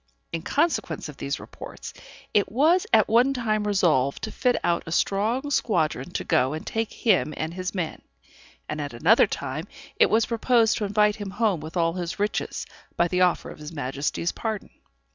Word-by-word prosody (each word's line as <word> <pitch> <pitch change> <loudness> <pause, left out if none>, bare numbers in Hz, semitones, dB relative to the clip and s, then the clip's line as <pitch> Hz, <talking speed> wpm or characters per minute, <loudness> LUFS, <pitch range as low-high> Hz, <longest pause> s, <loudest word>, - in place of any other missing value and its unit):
In 165 - -3
consequence 310 - 0
of - - -10
these - - -3
reports, - - -9 0.4
it 205 - +2
was 325 - +3
at - - +5
one 245 +5 +4
time 215 -4 0
resolved 155 -10 +2
to 220 - -3
fit 250 +3 +1
out 170 - +1
a - - -5
strong 225 - 0
squadron 160 - 0
to - - -2
go 150 -4 +2
and 155 - -6
take 225 -1 -2
him 190 -9 +1
and 160 +1 -3
his 185 +2 -4
men; 170 -4 -3 0.7
and 150 - -3
at 145 -3 -5
another 190 - +5
time 145 +1 -4 0.3
it - - +5
was 220 +1 +3
proposed 230 -1 +2
to 210 - -1
invite 210 +1 +2
him 205 -2 -5
home 205 -3 +1
with 155 +3 -7
all 165 -1 +2
his 175 -1 -4
riches, 205 +1 -2 0.3
by 170 - +3
the 180 +1 0
offer 180 -1 +2
of - - -12
his 150 +1 -8
Majesty's 145 +3 -2
pardon. 220 -3 -4
195 Hz, 185 wpm, -25 LUFS, 160-225 Hz, 0.7 s, at